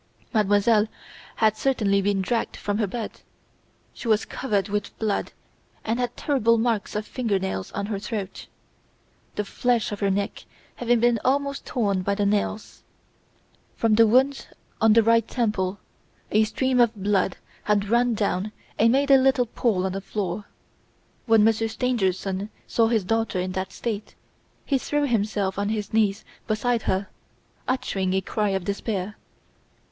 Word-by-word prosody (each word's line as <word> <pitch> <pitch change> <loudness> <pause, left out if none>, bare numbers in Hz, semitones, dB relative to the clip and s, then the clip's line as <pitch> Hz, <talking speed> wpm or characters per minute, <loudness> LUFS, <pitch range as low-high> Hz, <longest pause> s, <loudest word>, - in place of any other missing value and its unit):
Mademoiselle 210 +1 +3 0.5
had 220 -1 +3
certainly 215 -7 +1
been 195 -1 +1
dragged 230 +5 -1
from 205 +1 -2
her 215 - +1
bed. 225 +3 -6 0.7
She - - -8
was 215 -1 +3
covered 210 -6 -1
with 205 0 -3
blood 215 -2 -1 0.5
and 225 +2 0
had 245 -1 -2
terrible 230 -6 +2
marks 225 -3 0
of 210 0 -2
finger 225 -6 -1
nails 190 - -3
on 200 - -2
her 205 -1 -3
throat, 205 -2 -5 0.9
the 210 - -2
flesh 240 +2 0
of 205 - -4
her 200 - +1
neck 200 +1 -2 0.3
having 240 -1 +2
been 240 -1 +3
almost 280 +1 0
torn 200 -6 0
by 200 +2 0
the 205 0 0
nails. 210 +1 -1 0.9
From 225 -2 +2
a 225 - +8
wound 265 +5 +2 0.3
on 220 -1 +6
the 230 0 +6
right 230 0 +3
temple 205 -5 -1 0.5
a 215 +1 +4
stream 260 +3 0
of 235 -1 +4
blood 195 -2 0 0.3
had 205 -1 +2
run 240 0 +3
down 205 -1 -1 0.3
and 230 +1 +5
made 280 +2 +2
a 270 - +9
little 260 -1 +3
pool 215 -5 0
on 190 - -1
the 195 +1 -4
floor. 200 0 -3 0.8
When 225 -2 +5
Monsieur 225 +1 +3
Stangerson 200 -4 -1 0.2
saw 230 -1 +2
his 225 -3 +1
daughter 225 -1 0
in 185 +1 -2
that 190 +1 -3
state, 215 -3 -5 0.5
he 275 -2 +1
threw 295 +2 0
himself 205 -5 0
on 205 0 0
his 215 -2 -3
knees 215 -2 +1 0.2
beside 230 +2 +1
her, 190 +1 0 0.6
uttering 195 -8 -1
a 190 - +2
cry 210 +2 -1
of 190 -2 -1
despair. 200 0 -3
215 Hz, 160 wpm, -25 LUFS, 200-235 Hz, 0.9 s, a